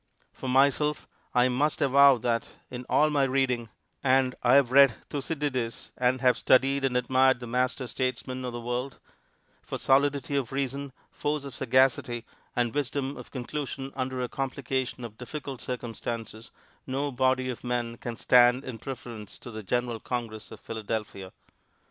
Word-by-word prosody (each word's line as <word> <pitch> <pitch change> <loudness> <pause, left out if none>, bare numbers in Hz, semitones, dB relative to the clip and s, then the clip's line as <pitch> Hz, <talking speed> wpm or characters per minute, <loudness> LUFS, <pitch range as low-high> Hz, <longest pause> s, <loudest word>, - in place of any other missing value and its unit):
For 130 - -6
myself, 140 +3 +2 0.3
I 125 0 +5
must 140 +4 0
avow 140 0 +6
that, 115 0 -1 0.2
in 125 0 -7
all 155 +1 +4
my 145 -1 +2
reading 130 -3 +1 0.3
and 130 -1 +3
I 125 +1 +5
have 135 -3 +5
read 135 -3 +7 0.2
Thucydides 140 -5 -3
and 130 +1 +1
have 125 -2 +4
studied 135 +1 +3
and 125 -2 +1
admired 130 +1 +3
the 125 - -7
master 125 +2 0
statesmen 130 +1 -3
of 125 - -3
the 120 - -5
world 125 +3 -3 0.6
for - - -5
solidity 140 +1 +2
of 135 -4 -1
reason, 140 +1 -3 0.2
force 150 -1 -2
of 140 - -7
sagacity, 125 -2 +2 0.3
and 120 -2 +1
wisdom 140 -1 -2
of - - -10
conclusion 135 +1 -5
under 130 -1 -2
a - - -1
complication 130 -1 -3
of 110 -2 -10
difficult 135 0 -6
circumstances, 115 -2 -5 0.4
no 140 +2 -1
body 130 0 +1
of 120 - -9
men 120 -1 -2
can 120 -1 -6
stand 125 +1 +5
in 120 -3 -6
preference 120 -4 -8
to 120 - -10
the 110 0 -6
general 120 +2 -1
Congress 110 -3 -5
of 110 - -11
Philadelphia. 105 -4 -5
130 Hz, 155 wpm, -28 LUFS, 120-135 Hz, 0.6 s, read